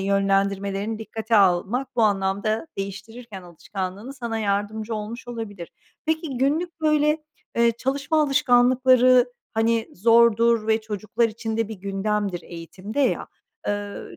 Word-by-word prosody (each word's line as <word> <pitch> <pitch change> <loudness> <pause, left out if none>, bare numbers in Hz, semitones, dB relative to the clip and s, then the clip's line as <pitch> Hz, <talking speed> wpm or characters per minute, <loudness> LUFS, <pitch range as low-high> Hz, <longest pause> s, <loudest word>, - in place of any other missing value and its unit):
yönlendirmelerini 195 +2 0
dikkate 220 0 -1
almak 195 +7 +2
bu 230 - +3
anlamda 205 +4 0
değiştirirken 200 +1 -7
alışkanlığını 190 +6 -6
sana 235 -4 -4
yardımcı 210 +2 -2
olmuş 220 +3 -6
olabilir. 205 -7 -6 0.4
Peki, 315 -4 -1
günlük, 320 +6 0
böyle, 305 0 +2 0.3
eee, 235 0 +4
çalışma 285 +4 0
alışkanlıkları 255 -2 +4 0.2
hani 225 0 +1
zordur 230 +1 +4
ve 220 0 +2
çocuklar 215 +2 -1
için 220 0 -5
de 225 -1 0
bir 220 - -5
gündemdir 200 -2 -2
eğitimde 185 +8 -6
ya. 270 - +1 0.4
Eee, 205 0 -4
220 Hz, 120 wpm, -24 LUFS, 200-245 Hz, 0.4 s, eee